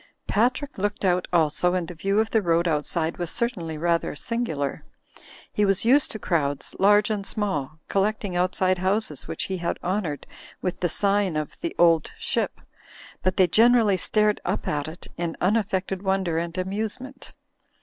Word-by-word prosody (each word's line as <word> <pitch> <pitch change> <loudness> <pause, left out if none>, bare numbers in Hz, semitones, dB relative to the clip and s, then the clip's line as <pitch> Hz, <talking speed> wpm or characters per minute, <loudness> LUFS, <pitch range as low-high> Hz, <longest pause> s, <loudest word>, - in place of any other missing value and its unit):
Patrick 255 +5 0
looked 205 0 -1
out 180 -1 +2
also 175 +1 +2
and 175 -2 -1
the 180 - -7
view 195 +5 0
of 220 0 0
the 220 - +3
road 170 -1 +2
outside 160 +1 -1
was 175 -2 -3
certainly 185 -10 -2
rather 170 0 0
singular. 160 - -2 0.7
He 210 - +1
was 195 +1 +2
used 270 +4 +4
to - - -5
crowds, 150 -8 -1
large 205 +2 +5
and 205 -2 -1
small, 160 -9 -2
collecting 200 -1 0
outside 185 +1 +1
houses 190 -5 0
which - - -3
he 190 - -3
had 170 -1 -2
honoured 175 -6 -2 0.3
with 180 - -3
the 175 - 0
sign 200 -1 +2
of 155 -1 -3
"The 335 - -3
Old 165 -2 +4
Ship," - - -1 0.6
but 185 0 0
they 185 - +6
generally 225 +2 +4
stared 210 +3 +1
up - - -2
at 145 -1 -1
it 160 +2 -8
in 170 -1 -2
unaffected 195 -1 0
wonder 190 -4 0
and 170 +1 -4
amusement. 220 +8 -4
185 Hz, 165 wpm, -25 LUFS, 170-210 Hz, 0.7 s, they